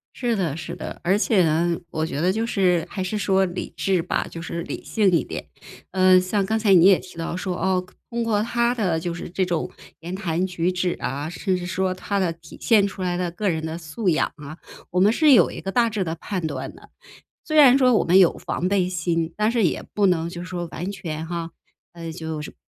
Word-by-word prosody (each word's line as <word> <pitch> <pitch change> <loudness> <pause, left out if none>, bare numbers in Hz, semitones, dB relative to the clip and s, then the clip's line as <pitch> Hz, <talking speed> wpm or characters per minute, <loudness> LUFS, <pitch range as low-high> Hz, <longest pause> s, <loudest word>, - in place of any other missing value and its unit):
是 240 -2 0
的 175 -8 -1
是 160 - -6
的。 - - -7
而 185 +3 +3
且 210 -3 +3
呢， 165 +2 +1
我 155 -1 -2
觉 145 - -4
得 180 +4 +2
就 220 +4 -1
是 180 -7 +1
还 190 - -4
是 185 +3 -2
说 195 -2 +2
理 180 0 -5
智 190 -3 +1
吧， 180 - -2
就 165 - -8
是 170 0 -4
理 - - -6
性 210 -3 +2
一 170 - +3
点。 - - -7 0.4
呃， 185 0 +5
像 190 +2 0
刚 220 +3 0
才 210 -3 +4
你 175 -1 +7
也 195 -1 +6
提 180 - -13
到 165 +1 -3
说， 185 0 -3
哦， 185 0 +1
可 180 - -19
通 235 0 -2
过 210 -2 +1
他 235 +1 +1
的 185 -8 0
就 170 +1 -3
是 175 - -7
这 185 +2 0
种 175 -3 -2 0.3
言 170 +3 -7
谈 185 -2 -1
举 180 -1 -1
止 180 0 0
啊， 145 +4 -3
甚 185 +2 -1
至 180 -1 -4
说 185 +1 -1
他 200 +2 -2
的 180 -3 0
体 165 -1 -14
现 215 -4 +4
出 200 -1 -6
来 180 -1 -1
的 175 -1 -2
个 200 +4 -3
人 160 -2 -2
的 160 +1 -4
素 175 +5 -2
养 160 - +1
啊， 150 +1 -10 0.3
我 180 - 0
们 205 +4 +5
是 305 +3 +4
有 210 -10 +6
一 - - -7
个 195 - -4
大 235 +1 +3
致 210 -3 -1
的 165 -2 -3
判 180 +1 -4
断 155 - -4
的。 - - -17 0.6
虽 310 - -3
然 270 -3 +8
说 255 -2 +4
我 - - +3
们 180 +3 +5
有 180 -3 +4
防 180 - -2
备 185 -2 +1
心， 170 -2 -1
但 215 +1 +2
是 235 -2 +1
也 175 - 0
不 205 - +2
能 165 -3 +1
就 175 0 -7
是 - - -8
说 175 -1 -4
完 180 +4 -4
全 165 -5 -5
哈， 170 -1 -4 0.7
就 160 -2 -4
是， 150 - -8
180 Hz, 260 characters per minute, -23 LUFS, 170-200 Hz, 0.7 s, 然